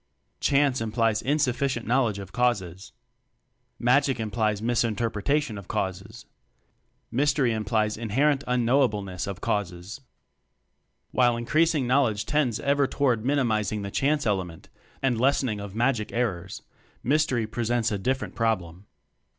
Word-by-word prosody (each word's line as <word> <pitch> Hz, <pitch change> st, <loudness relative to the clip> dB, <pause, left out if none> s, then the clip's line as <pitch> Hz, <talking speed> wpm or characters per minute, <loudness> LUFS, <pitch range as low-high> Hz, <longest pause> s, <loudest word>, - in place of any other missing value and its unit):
"Chance" 140 Hz, -3 st, +2 dB
implies 115 Hz, -1 st, +1 dB
insufficient 135 Hz, -3 st, 0 dB
knowl 125 Hz, 0 st, +2 dB
edge 100 Hz, -, -5 dB
of 100 Hz, -2 st, -8 dB
causes. 100 Hz, -7 st, -1 dB, 0.9 s
"Magic" 130 Hz, +1 st, +2 dB
implies 110 Hz, -1 st, -1 dB
misinterpretation 115 Hz, +2 st, 0 dB
of 100 Hz, -, -12 dB
causes. 95 Hz, +4 st, -4 dB, 0.9 s
"Mystery" 135 Hz, -2 st, +2 dB
implies 110 Hz, 0 st, 0 dB
inherent 135 Hz, +6 st, +1 dB
un 125 Hz, -1 st, +1 dB
knowableness 105 Hz, -9 st, +1 dB
of 100 Hz, -2 st, -6 dB
causes. 95 Hz, +4 st, -3 dB, 1.1 s
While 120 Hz, -2 st, +3 dB
increasing 155 Hz, +4 st, +2 dB
knowledge 120 Hz, -5 st, +2 dB
tends 140 Hz, -7 st, 0 dB
ever 140 Hz, 0 st, +2 dB
toward 125 Hz, -7 st, 0 dB
minimizing 110 Hz, -6 st, 0 dB
the 100 Hz, -, -5 dB
"chance" 145 Hz, +4 st, +1 dB
element 95 Hz, -6 st, -2 dB, 0.3 s
and 125 Hz, -4 st, +1 dB
lessening 130 Hz, -5 st, +1 dB
of 100 Hz, 0 st, -8 dB
"magic" 120 Hz, -2 st, 0 dB
errors, 95 Hz, -7 st, -3 dB, 0.4 s
mystery 135 Hz, -4 st, +1 dB
presents 115 Hz, +1 st, -1 dB
a 105 Hz, -, -2 dB
different 130 Hz, +6 st, -2 dB
problem. 100 Hz, -5 st, -2 dB
115 Hz, 120 wpm, -26 LUFS, 105-135 Hz, 1.1 s, While